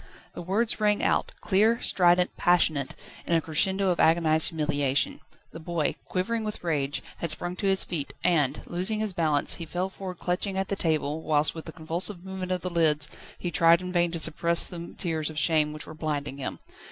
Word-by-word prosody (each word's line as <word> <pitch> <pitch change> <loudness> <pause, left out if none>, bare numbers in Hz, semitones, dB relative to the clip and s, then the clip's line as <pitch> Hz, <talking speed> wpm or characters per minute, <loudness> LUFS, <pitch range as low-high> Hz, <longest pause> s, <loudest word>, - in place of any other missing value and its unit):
The - - -7
words 215 +6 0
rang 210 -1 +2
out, - - +1
clear, 220 +4 +3
strident, 180 0 +2
passionate, 160 -6 +2 0.3
in 170 - +2
a - - +4
crescendo 190 +5 +1
of 175 - -2
agonised 160 -1 +3
humiliation. 150 - 0 0.3
The 165 - -9
boy, 165 -2 -1
quivering 220 +5 -2
with 210 -3 -5
rage, 145 -4 -1
had 170 - -3
sprung 175 +3 -1
to 200 - -1
his 190 0 +3
feet, 155 -5 -4
and, 160 -7 +1
losing 185 +5 -1
his 215 -3 -1
balance, 155 -4 +1
he 170 - -6
fell 180 +4 -2
forward 185 -2 -7
clutching 190 +3 -2
at 190 0 -2
the 200 - -1
table, 155 -3 -1
whilst 150 -1 +2
with 160 0 -8
a - - -6
convulsive 175 +3 -2
movement 190 -1 -5
of 180 -1 -1
the 180 - -3
lids, 155 -3 +2 0.3
he 175 - -4
tried 165 0 +5
in 180 0 -6
vain 175 -1 +2
to 165 - -4
suppress 170 +1 +3
the 170 -1 -8
tears 160 -4 -2
of 155 - -9
shame 155 -2 +3
which 150 0 -6
were - - -10
blinding 145 -3 -3
him. 135 - -4
170 Hz, 200 wpm, -27 LUFS, 155-185 Hz, 0.3 s, tried